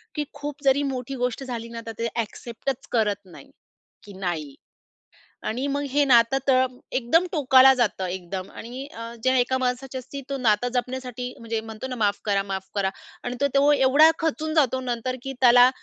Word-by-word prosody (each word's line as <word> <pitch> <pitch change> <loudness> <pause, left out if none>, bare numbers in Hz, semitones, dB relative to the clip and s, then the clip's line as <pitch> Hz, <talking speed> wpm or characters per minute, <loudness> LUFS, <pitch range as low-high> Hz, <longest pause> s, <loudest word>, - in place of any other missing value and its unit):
की 300 - 0
खूप 290 0 -7
जरी 275 +1 +3
मोठी 255 +1 -5
गोष्ट 250 +1 -2
झाली 235 -3 -5
ना, 230 0 -7
तर 225 - -5
ते 230 - 0
ॲक्सेप्टच 235 +3 -4
करत 205 -3 0
नाही, 180 - -14 0.6
की 205 - -11
नाही. 165 -7 -3 0.9
आणि 250 +5 -2
मग 285 0 -1
हे 290 +2 +3
नातं 240 0 +5
तर 260 -1 +5 0.3
एकदम 270 +8 +3
टोकाला 265 -4 +6
जातं, 230 -7 0
एकदम. 185 +1 -5
आणि 250 +4 -8
अ, 230 +1 -7
जे 260 0 +3
एका 255 +1 +1
माणसाच्या 260 +1 -2
असती, 275 +3 -8
तो 275 - -2
नातं 230 -2 +2
जपण्यासाठी, 250 0 -3
म्हणजे 230 -1 -3
म्हणतो 220 +3 -7
ना, 255 - -5
"माफ 205 -3 +1
करा, 200 -2 +1
माफ 190 -1 -5
करा" 195 -1 +1 0.3
आणि 245 - -3
तो 280 - +4
तो 285 +1 +5
एवढा 285 +3 +6
खचून 315 -1 -1
जातो 265 -5 +3
नंतर, 250 0 -2
की 270 - -4
त्याला 245 0 +8
250 Hz, 180 wpm, -24 LUFS, 225-270 Hz, 0.9 s, त्याला